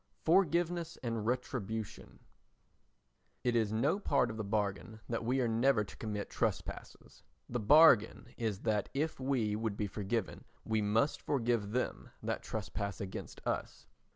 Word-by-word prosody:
Forgiveness 170 -1 +2
and 115 -3 -2
Retribution 110 -4 -3 1.2
It 120 -1 +1
is 110 -3 +2
no 140 - +1
part 125 - +2
of 110 - -7
the 110 - -2
bargain 105 +1 -2
that 115 -1 -2
we 130 +3 +1
are 120 - +2
never 115 0 +3
to 100 - -11
commit 105 -2 -4
trespasses. - - -4 0.3
The 120 - -2
bargain 120 -2 +5
is 110 -4 -2
that 105 -2 0
if 155 +2 -1
we 130 -6 0
would 110 -1 -2
be 105 - 0
forgiven 105 +3 -3 0.2
we 110 -1 +1
must 110 +8 +1
forgive 120 -6 0
them 125 +4 -2
that - - -2
trespass 100 -1 -4
against 95 -1 -7
us. - - -3
115 Hz, 145 wpm, -33 LUFS, 105-130 Hz, 1.2 s, bargain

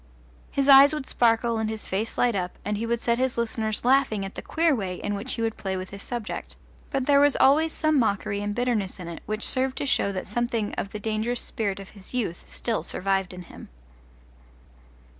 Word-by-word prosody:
His 275 0 0
eyes 280 +2 +8
would 300 - -4
sparkle 230 -1 +2
and 220 -1 -1
his 220 -1 -6
face 210 +4 -2
light 245 -1 +3
up, 180 -3 -3
and 210 +1 -1
he 225 +3 -3
would 235 0 0
set 235 0 +1
his 260 -1 0
listeners 220 -1 -2
laughing 255 -6 +3
at 195 - -7
the - - -6
queer 325 -2 +2
way 190 -5 -3
in 205 +3 -3
which 205 +6 -3
he 230 - -2
would 225 -1 -1
play 190 -1 -3
with 185 0 -6
his 200 0 -8
subject; 235 -2 -5 0.3
but 270 -2 -1
there 280 0 +5
was 290 -1 +5
always 310 +4 +4
some 310 -2 +2
mockery 200 -2 0
and 205 0 -3
bitterness 230 -6 -1
in 175 - -7
it 170 - -7
which 215 +1 -1
served 260 0 0
to - - -2
show 200 -6 +2
that 185 -1 -4
something 230 0 -1
of 195 - -3
the 210 - -6
dangerous 220 +3 -1
spirit 200 -3 -2
of 195 - -10
his 200 +3 -10
youth 205 -9 -3
still 230 -2 -2
survived 195 0 -1
in 180 -1 -8
him. - - -12
225 Hz, 215 wpm, -26 LUFS, 200-250 Hz, 0.3 s, eyes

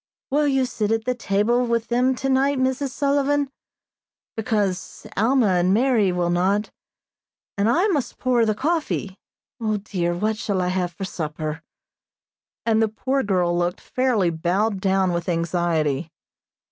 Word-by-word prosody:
"Will 295 +1 +2
you 270 -2 +2
sit 215 -3 -2
at 235 +2 -1
table 220 +5 +2
with 235 -1 -1
them 250 +2 +2
tonight, 270 +2 +1
Mrs. 260 +2 0
Sullivan? 285 +1 +1 0.8
because 205 -4 -2
Alma 235 +1 +3
and 180 +2 +3
Mary 230 -5 +3
will 175 -1 0
not, 195 +4 +1 0.8
and 200 +2 +1
I 345 - +3
must 295 -9 -1
pour 250 -2 +2
the 215 -1 +1
coffee. 280 - -2 0.4
O, 215 -2 0
dear, 180 -4 -2
what 215 +4 -1
shall 200 -3 -1
I 180 0 0
have 180 -1 -1
for 195 +3 -6
supper?" 155 -2 -4 1.0
and 225 -1 +3
the 225 - +3
poor 265 +5 -1
girl 180 -5 +1
looked 175 +1 -1
fairly 240 -9 +1
bowed 190 +5 0
down 190 -1 +2
with 170 +1 -2
anxiety. 165 -3 0
210 Hz, 145 wpm, -23 LUFS, 180-255 Hz, 1.0 s, Alma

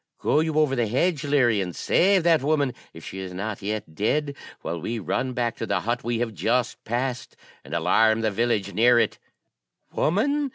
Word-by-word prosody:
'Go 150 - +1
you 160 -1 0
over 150 -3 +3
the 120 -3 0
hedge, 150 - 0
Leary, 125 -8 +2
and 90 -2 -4
save 190 -1 +3
that 165 -3 +4
woman, 145 -2 +1 0.2
if 80 - -12
she 95 - -7
is 95 -1 -6
not 105 +2 -4
yet 105 -4 -4
dead, 140 - 0 0.3
while 85 -1 -4
we 115 +7 -3
run 110 +7 -2
back 120 -2 -1
to - - -4
the - - 0
hut 120 +2 -2
we 120 0 -1
have 115 -1 -2
just 120 +2 -1
passed, 125 +2 -3 0.3
and - - -6
alarm 110 +7 +3
the 110 -1 0
village 105 -2 0
near 120 +2 +5
it.' 120 - +1 0.7
'Woman!' 280 - +1
120 Hz, 195 wpm, -24 LUFS, 105-145 Hz, 0.7 s, near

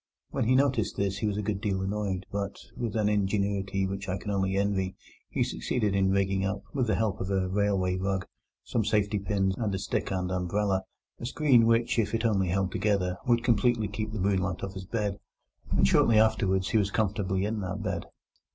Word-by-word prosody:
When - - 0
he 130 - +4
noticed 135 -5 +2
this 100 0 -1
he 110 - 0
was 105 -1 -1
a 105 - -2
good 100 -1 -2
deal 100 -4 0
annoyed, 95 -1 -2
but, 100 0 -3 0.2
with 115 -4 -3
an 105 -2 +2
ingenuity 100 -1 0
which 95 +1 -4
I 95 - -1
can 105 - -5
only 95 -1 0
envy, 95 -2 0 0.3
he - - +1
succeeded 105 -5 -1
in 95 -1 +2
rigging 95 0 +1
up, 95 +1 -2
with 130 -4 0
the 110 - +2
help 105 0 -1
of 95 - -3
a 95 -1 +1
railway 95 -1 +1
rug, 95 0 -1 0.4
some 115 - 0
safety 105 0 +1
pins, 95 -1 0
and 105 -4 0
a - - 0
stick 100 +1 -2
and 90 -1 -2
umbrella, 95 +2 0 0.4
a 120 - -4
screen 130 -5 +4
which, 115 0 +2
if 115 0 +1
it 115 +1 -1
only 100 -4 +2
held 95 +1 0
together, 95 -3 0
would 120 -1 +3
completely 120 -1 +2
keep 105 +1 -4
the 110 - -4
moonlight 95 -2 0
off 100 -1 -4
his 95 -1 -7
bed. 105 -1 -2 0.5
And 65 0 +3
shortly 110 - +4
afterwards 100 -4 +3
he 110 - +3
was 100 -2 +1
comfortably 100 -2 0
in 110 +1 -2
that 95 +2 -4
bed. 95 -5 -2
100 Hz, 205 wpm, -28 LUFS, 95-110 Hz, 0.5 s, he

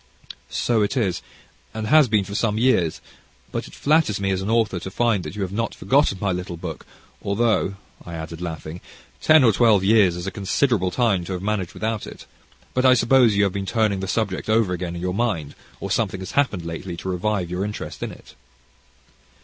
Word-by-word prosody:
"So 115 -3 +1
it 105 +6 0
is, 95 -8 0 0.5
and 110 -1 -3
has 150 +3 +5
been 105 -3 +2
for 100 +1 -8
some 105 0 0
years; 110 -10 +2 0.5
but - - -4
it - - -13
flatters 150 -9 +2
me 95 -1 0
as 95 0 -1
an 95 - -3
author 110 -5 +1
to 95 - -6
find 110 -2 +1
that - - -7
you 105 - -2
have 95 - -4
not 115 +3 -2
forgotten 135 -7 +2
my 100 -1 0
little 90 -1 -4
book, 80 -2 -7 0.3
although," 100 -1 +1 0.3
I 85 - -8
added, 80 +1 -7
laughing, 80 0 -6 0.4
"ten 155 -2 +6
or 115 - +6
twelve 110 -4 +4
years 100 -4 +4
is 90 0 -5
a 95 - -3
considerable 100 0 +1
time 100 -4 +1
to 95 - -4
have 90 0 -5
managed 100 -4 -2
without 110 -1 -3
it; - - -11 0.5
but 130 - +1
I 130 -1 +6
suppose 120 -2 +4
you 105 - +3
have 100 -2 +1
been 100 -1 -4
turning 110 -2 +1
the 95 - -4
subject 100 -1 -2
over 110 -4 +2
again 85 -1 -4
in 85 - -6
your 90 0 -1
mind, 90 -10 -1 0.3
or - - -5
something 95 - 0
has 95 - -6
happened 105 -12 0
lately 85 +1 -5
to 85 - -7
revive 90 -1 -1
your 90 +2 -2
interest 105 0 -6
in - - -3
it." - - -15
100 Hz, 210 wpm, -23 LUFS, 90-115 Hz, 0.5 s, ten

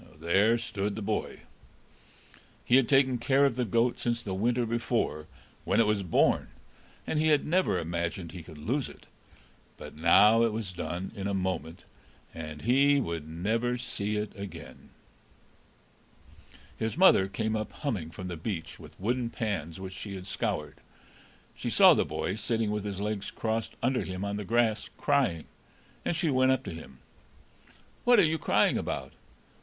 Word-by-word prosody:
There 100 +8 +3
stood 105 -3 -3
the 110 - -5
boy. 105 +1 -3 1.2
He 125 - +5
had 135 -3 +2
taken 130 -3 +4
care 135 +4 +3
of 135 -4 +1
the 125 -1 0
goat 115 +3 +1
since 120 -1 -1
the 95 - -4
winter 120 +5 +1
before, 115 -9 -1 0.4
when - - +1
it 115 - +5
was 105 -1 +1
born, 90 -4 +2 0.6
and 155 - -1
he 155 - +2
had 150 -2 +3
never 175 - +2
imagined 85 +1 -3
he 90 - -8
could 80 -1 -12
lose 125 - -2
it; - - -15 0.7
but - - -10
now 100 +8 +6
it 115 -1 +3
was 105 -4 -4
done 85 +2 -4
in 100 -2 -3
a 100 - -1
moment, 90 -3 -3 0.5
and 75 -2 -7
he 140 +4 +4
would 85 - -4
never 115 +9 -1
see 105 -3 -3
it 105 0 -3
again. 100 -1 -9 1.9
His 110 +5 -2
mother 180 - +6
came 110 +3 -2
up 110 0 -3
humming 105 - -3
from 90 +3 -8
the 90 - -4
beach, 85 0 -5
with - - -14
wooden 120 +4 -1
pans 95 -9 -3
which 95 0 -7
she 100 +1 -7
had 90 -1 -8
scoured; 75 -5 -3 0.8
she - - -4
saw - - +7
the - - +1
boy - - -3
sitting 110 0 -1
with 105 -1 -3
his 100 -2 -4
legs 105 -1 -3
crossed 110 0 -3
under 130 +1 +1
him 95 +1 -5
on 100 0 -2
the 105 - -5
grass, 115 0 +1
crying, 130 - +1 0.6
and - - -1
she 160 -1 +1
went 130 0 +4
up 130 - +1
to - - -6
him. 80 -5 -11 1.1
"What 245 0 +6
are 200 - +6
you 160 +1 0
crying - - +2
about?" 65 0 -4
105 Hz, 170 wpm, -29 LUFS, 90-120 Hz, 1.9 s, saw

